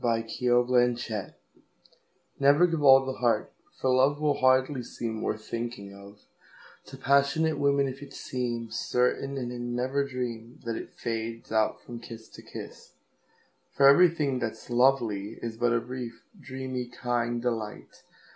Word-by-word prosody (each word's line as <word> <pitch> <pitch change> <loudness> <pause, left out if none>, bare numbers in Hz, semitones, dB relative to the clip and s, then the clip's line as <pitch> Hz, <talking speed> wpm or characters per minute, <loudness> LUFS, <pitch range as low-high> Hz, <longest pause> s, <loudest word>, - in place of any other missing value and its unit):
B. - - -1
Yeats 115 0 -1
1865 120 -3 +1 1.1
1939Never 145 +6 +5
give 165 -2 -1
all 135 -1 +7
the 130 0 -5
heart, 115 -3 +1 0.3
for 130 - +1
loveWill 145 +3 +2
hardly 130 +1 +3
seem 115 -2 -5
worth 110 0 -3
thinking 115 -4 -5
ofTo 100 +1 -16
passionate 140 +4 +2
women 140 -1 +3
if 135 +1 -7
it 145 - -9
seemCertain, 125 +2 -2
and 125 -2 -3
they 125 - -6
never 125 +3 -1
dreamThat 120 -3 -5
it - - -8
fades 115 -1 -4
out 110 -1 +1
from 120 -1 -8
kiss 115 -1 -10
to - - -13
kiss; - - -10 0.8
For 140 - +6
everything 150 -3 +5
that's 115 0 -5
lovely 120 -5 +2
isBut 115 +1 0
a - - +1
brief, 120 -1 -7 0.2
dreamy, 130 -4 -5
kind 120 -1 -2
delight. 115 -3 -4
125 Hz, 135 wpm, -28 LUFS, 115-135 Hz, 1.1 s, all